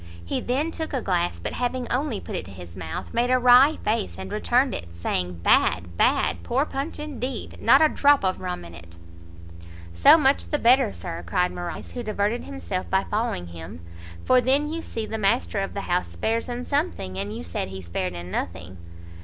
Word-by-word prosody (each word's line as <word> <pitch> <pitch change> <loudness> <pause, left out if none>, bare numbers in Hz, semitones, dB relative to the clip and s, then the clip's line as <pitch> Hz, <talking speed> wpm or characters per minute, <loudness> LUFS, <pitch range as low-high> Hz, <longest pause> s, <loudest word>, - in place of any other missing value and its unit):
He - - -2
then 285 +7 -1
took 320 -1 -4
a 265 - 0
glass, 175 - 0
but 85 - -5
having 245 0 -2
only 255 -4 0
put - - -8
it - - -3
to - - -11
his 90 -2 -11
mouth, 80 - -6
made 240 +1 +1
a 255 - +4
wry 255 +4 +6
face, 215 -1 -1
and - - -7
returned 245 +5 +2
it, 85 0 -7
saying 90 0 -2
"Bad! 85 -1 +3
bad! 85 0 +2
poor 265 - 0
punch 275 +2 -4
indeed! 265 -5 -5
not 270 +6 +6
a - - +7
drop 285 -6 +3
of 185 - -1
rum 180 - -4
in 85 - -11
it! 85 0 -13 1.0
"So 85 - +7
much 280 -3 +2
the 295 - 0
better, 255 - +4
Sir," 85 -1 -6
cried 180 - +1
Morrice, 175 -1 -6
who 245 - -5
diverted 215 +1 -1
himself 90 - -5
by 190 0 +2
following 210 - -1
him, 80 -1 -9 0.4
"for 255 -1 +5
then 280 +5 +1
you 330 - -3
see 225 -8 -5
the 220 0 -4
master 215 0 +1
of 195 - -3
the 200 - -2
house 180 -1 0
spares 230 +2 -2
in 245 +1 -4
something, 280 - -2
and 100 +2 -4
you - - -6
said 85 +2 -4
he 95 0 -7
spared 90 0 -3
in 85 +1 -7
nothing." 90 +1 -4
210 Hz, 205 wpm, -25 LUFS, -, 1.0 s, a